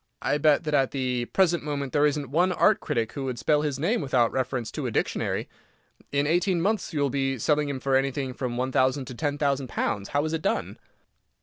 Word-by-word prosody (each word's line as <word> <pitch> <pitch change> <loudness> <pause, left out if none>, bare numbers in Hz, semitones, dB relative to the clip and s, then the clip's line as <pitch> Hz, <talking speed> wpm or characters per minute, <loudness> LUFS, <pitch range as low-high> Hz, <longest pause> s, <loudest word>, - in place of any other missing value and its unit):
I 145 - +1
bet 150 +1 +4
that 150 -1 -3
at 135 -2 +3
the 125 -3 -1
present 175 +3 +2
moment 140 -3 -3
there 150 0 +4
isn't 145 -3 -3
one 175 +5 +3
art 215 +3 +3
critic 115 -1 -2
who 135 -2 -4
could 125 -2 -3
spell 150 +4 +2
his 145 -3 -2
name 175 - 0
without 130 -5 +2
reference 130 -3 -2
to - - -3
a - - -3
dictionary. - - -1 0.6
In 140 0 +1
eighteen 175 +3 +2
months 200 +3 0
you 150 -4 -1
will 140 -2 +1
be 135 -1 0
selling 150 +4 +1
him 135 -2 -3
for 135 0 +1
anything 135 0 0
from 125 -2 -4
one 130 +1 -1
thousand 130 +1 +2
to - - -6
ten 145 +3 -2
thousand 140 -2 0
pounds. 100 -3 -2
How 145 +2 0
is 155 - -2
it 160 - -1
done?" - - -2
140 Hz, 225 wpm, -26 LUFS, 130-150 Hz, 0.6 s, bet